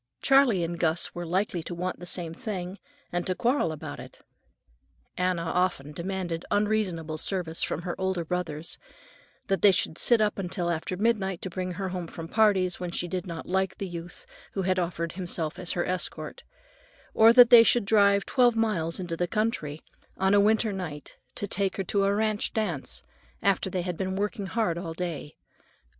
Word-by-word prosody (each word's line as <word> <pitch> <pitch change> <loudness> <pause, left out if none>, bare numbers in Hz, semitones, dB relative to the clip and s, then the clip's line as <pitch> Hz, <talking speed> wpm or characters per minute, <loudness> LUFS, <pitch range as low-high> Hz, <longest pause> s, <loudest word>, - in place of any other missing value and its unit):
Charley 270 -9 +4
and 170 0 -3
Gus 165 +1 +1
were 175 -1 -5
likely 185 0 0
to 175 +2 -6
want 180 +2 -3
the 180 - -7
same 170 -2 -1
thing, 190 -3 -5 0.3
and 175 0 -2
to 185 - 0
quarrel 240 - +1
about 155 - -7
it. - - -11 1.0
Anna 180 -2 0
often 170 -4 0
demanded 175 0 -3
unreasonable 190 -7 0
service 175 -3 -2
from 165 - -1
her 175 -1 -2
older 190 -3 -1
brothers; 165 -2 -4 0.7
that 195 -1 0
they 205 - +8
should 160 -3 -1
sit 235 -2 +5
up 210 -1 +1
until 180 -2 -1
after 170 +2 -3
midnight 200 -4 +1
to 185 - -4
bring 185 0 -3
her 190 +1 -3
home 180 -2 -4
from 165 0 -7
parties 190 -3 +2
when 180 -1 -3
she 175 +1 -2
did 185 +1 -4
not 165 -2 -6
like 190 +1 0
the 195 - -4
youth 175 - -8 0.3
who 195 - -1
had 185 0 +1
offered 170 -1 -2
himself 170 -3 -3
as 180 - -2
her 175 - 0
escort; 185 -1 -4 0.7
or 225 +1 +7
that 245 0 +8
they 240 -1 +11
should 230 -1 +3
drive 200 -1 +4
twelve 245 -3 +3
miles 190 -8 0
into 175 -2 -3
the 175 +1 -1
country, 175 -9 -2 0.3
on 190 +1 +2
a 205 - +6
winter 215 +1 +3
night, 160 -7 -7 0.2
to - - -3
take 195 -1 -1
her 195 - -1
to 195 +2 +1
a 200 - +3
ranch 215 0 0
dance, 190 -11 -2 0.4
after - - +2
they 180 -2 -2
had 180 -2 -3
been 190 +1 -2
working 200 0 -2
hard 190 -5 0
all 165 -2 -6
day. 165 -4 -5
185 Hz, 185 wpm, -27 LUFS, 170-205 Hz, 1.0 s, they